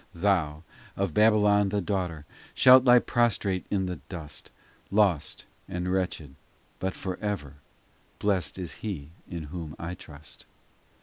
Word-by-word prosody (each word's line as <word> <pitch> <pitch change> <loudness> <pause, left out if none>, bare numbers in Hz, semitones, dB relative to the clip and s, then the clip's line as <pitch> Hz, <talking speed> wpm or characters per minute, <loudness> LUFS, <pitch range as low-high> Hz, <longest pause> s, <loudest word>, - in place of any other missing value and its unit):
XIV - - -12
Thou, 80 -6 +1 0.3
of 95 -5 -1
Babylon 105 -1 +4
the 100 +1 0
daughter, 90 -5 -2 0.3
Shalt 130 0 +8
lie 125 -1 +8
prostrate 110 -6 +1
in 95 -2 0
the 90 -2 -4
dust, 80 -4 -8 0.4
Lost 100 -7 +1 0.2
and 90 +1 -3
wretched: 90 -7 -2 0.5
but 95 0 -2
for 95 -2 -4
ever 90 -10 -4 0.6
Blest 95 -5 0
is 90 -3 -5
He 80 -9 -5 0.2
in 85 -2 -5
Whom 80 -4 -6
I 85 +2 -5
trust. 75 -3 -11
95 Hz, 135 wpm, -27 LUFS, 80-105 Hz, 0.6 s, Shalt